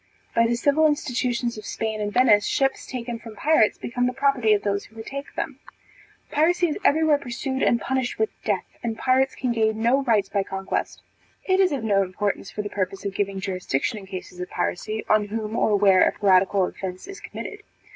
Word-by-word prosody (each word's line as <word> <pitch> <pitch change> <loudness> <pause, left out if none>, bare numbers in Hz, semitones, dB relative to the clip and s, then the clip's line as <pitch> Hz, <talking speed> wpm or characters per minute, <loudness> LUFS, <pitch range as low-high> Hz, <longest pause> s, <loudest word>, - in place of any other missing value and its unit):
By 230 0 +4
the 235 - +1
civil 290 +5 +3
institutions 245 -5 -1
of - - -11
Spain 220 -1 -3
and 205 0 -2
Venice, 210 -4 +4
ships 270 -1 0
taken 240 -2 -5
from 225 -2 -11
pirates 295 -4 +3
became 245 +1 -1
the 250 - -2
property 265 -4 +2
of 205 - +1
those 200 0 -1
who 220 - -20
retake 275 +6 -7
them. - - -4 0.7
Piracy 345 +3 +3
is 300 - -2
every 320 -3 +4
where 300 -2 +4
pursued 265 +1 -4
and 235 - +3
punished 260 0 -2
with 220 0 0
death, 200 -4 0 0.2
and 225 -2 -3
pirates 260 +2 +2
can 255 -2 -1
gain 220 -1 +1
no 255 +4 +4
rights 220 -7 +2
by 200 0 0
conquest. 190 0 -4 0.4
It 375 0 +2
is 380 -2 +4
of 275 -5 -2
no 200 -3 +3
importance, 195 +1 -2
for 210 - -4
the - - -3
purpose 195 0 -3
of 200 - -2
giving 195 -1 -2
jurisdiction 185 -1 -2
in 195 - -12
cases 185 -1 -8
of 180 - -5
piracy, 215 +5 -3
on 215 -1 +3
whom 215 +1 -4
or 215 -2 +2
where 195 -2 +5
a - - +5
piratical 195 -1 +3
offence 185 0 -6
is 395 +1 -9
committed. 420 0 -8
225 Hz, 205 wpm, -24 LUFS, 200-265 Hz, 0.7 s, where